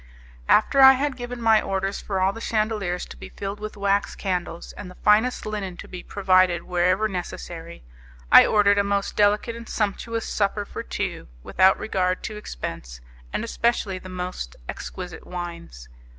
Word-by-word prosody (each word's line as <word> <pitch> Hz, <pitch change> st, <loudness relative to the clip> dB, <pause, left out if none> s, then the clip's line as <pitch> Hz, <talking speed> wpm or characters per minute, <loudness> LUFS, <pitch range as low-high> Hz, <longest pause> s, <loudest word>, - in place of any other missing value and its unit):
After 270 Hz, +6 st, +5 dB
I 265 Hz, 0 st, +10 dB
had 275 Hz, +1 st, -1 dB
given 245 Hz, -1 st, -6 dB
my 225 Hz, -2 st, +4 dB
orders 195 Hz, 0 st, -2 dB
for 195 Hz, -2 st, -2 dB
all 190 Hz, +1 st, +2 dB
the 225 Hz, -, -9 dB
chandeliers 215 Hz, -6 st, -1 dB
to -, -, -11 dB
be -, -, -10 dB
filled 200 Hz, +1 st, -6 dB
with 215 Hz, 0 st, -7 dB
wax 200 Hz, 0 st, +1 dB
candles, 180 Hz, -3 st, -3 dB
and 195 Hz, -, -9 dB
the 180 Hz, -, -13 dB
finest 215 Hz, +6 st, +2 dB
linen 200 Hz, -4 st, -4 dB
to -, -, -9 dB
be 180 Hz, -1 st, -8 dB
provided 185 Hz, -3 st, +2 dB
wherever 185 Hz, +4 st, +1 dB
necessary, 170 Hz, -, -7 dB, 0.5 s
I -, -, +11 dB
ordered 205 Hz, -1 st, +4 dB
a -, -, +3 dB
most 200 Hz, 0 st, -1 dB
delicate 210 Hz, +3 st, +2 dB
and 235 Hz, -1 st, -10 dB
sumptuous 225 Hz, +2 st, -2 dB
supper 205 Hz, 0 st, -1 dB
for -, -, -6 dB
two, -, -, -4 dB, 0.2 s
without 190 Hz, +1 st, +4 dB
regard 185 Hz, -3 st, -1 dB
to 215 Hz, -, -5 dB
expense, -, -, -7 dB, 0.3 s
and -, -, -2 dB
especially 230 Hz, -4 st, 0 dB
the 185 Hz, -, -11 dB
most 180 Hz, -, -5 dB
exquisite 180 Hz, -2 st, -7 dB
wines. 170 Hz, -, -7 dB
200 Hz, 165 wpm, -24 LUFS, 180-215 Hz, 0.5 s, I